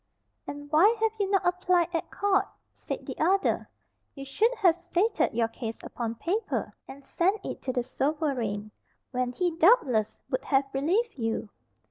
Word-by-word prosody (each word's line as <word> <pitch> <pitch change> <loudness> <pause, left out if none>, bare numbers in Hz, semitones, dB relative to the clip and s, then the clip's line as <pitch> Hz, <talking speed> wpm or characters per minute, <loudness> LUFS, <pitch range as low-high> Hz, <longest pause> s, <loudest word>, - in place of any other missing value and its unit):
"And 290 0 -7
why 400 +9 +5
have 445 0 +2
you 400 -1 0
not 390 -1 +2
applied 355 -1 +2
at 330 - -2
court?" 405 -1 +1 0.3
said - - -6
the - - -5
other: 385 +5 +2 0.5
"you 275 -1 -7
should 430 - +2
have 375 -8 +4
stated 355 +5 0
your 230 0 +1
case 225 0 -6
upon 230 -1 -4
paper, 380 - -2
and 275 +1 -11
sent 385 +4 0
it - - -5
to 260 - -2
the 245 -1 -1
sovereign, 255 -7 -2 0.4
when 250 -1 -1
he 350 +5 -1
doubtless 285 - +3
would - - -1
have 270 -1 +2
relieved 350 - 0
you." 225 -2 -2
320 Hz, 160 wpm, -28 LUFS, 255-390 Hz, 0.5 s, why